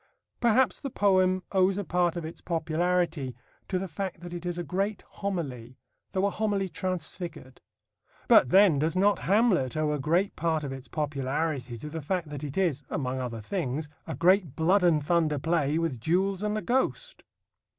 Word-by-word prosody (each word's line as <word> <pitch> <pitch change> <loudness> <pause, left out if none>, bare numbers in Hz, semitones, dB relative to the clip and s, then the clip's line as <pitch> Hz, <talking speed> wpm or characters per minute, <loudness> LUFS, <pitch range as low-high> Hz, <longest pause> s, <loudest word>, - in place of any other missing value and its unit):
Perhaps 240 -3 +3
the 275 - -4
poem 185 -4 +2
owes 190 0 +3
a 205 - -1
part 175 0 +1
of 170 - -4
its 160 - -8
popularity 165 -4 0 0.3
to 185 - -1
the 190 +1 -3
fact 180 +1 -5
that 175 0 -8
it 175 0 -5
is 175 -1 -2
a 175 - -2
great 195 +6 -2
homily, 135 - -5 0.4
though 190 +1 +1
a 200 - +1
homily 205 -3 0
transfigured. 170 -5 -5 0.7
But 125 - +6
then 190 -4 +6
does 160 +4 0
not 200 +2 +3
Hamlet 190 - +2
owe 155 -1 +1
a 150 - -2
great 170 +8 +1
part 160 -1 0
of 135 -2 -4
its 135 0 -9
popularity 140 -3 -2
to 135 - -8
the 160 0 -4
fact 170 +1 -2
that 145 -1 -6
it 145 +1 -5
is 165 -7 +1
(among 130 -2 -2
other 120 -3 -4
things) 150 - -3 0.2
a - - -4
great 180 -4 +3
blood 180 +5 +3
and 155 -4 +3
thunder 160 -3 +2
play 155 0 +1
with 165 -7 -1
duels 185 - +1
and 210 0 -1
a 215 - -3
ghost? 265 - -1
170 Hz, 180 wpm, -28 LUFS, 150-190 Hz, 0.7 s, But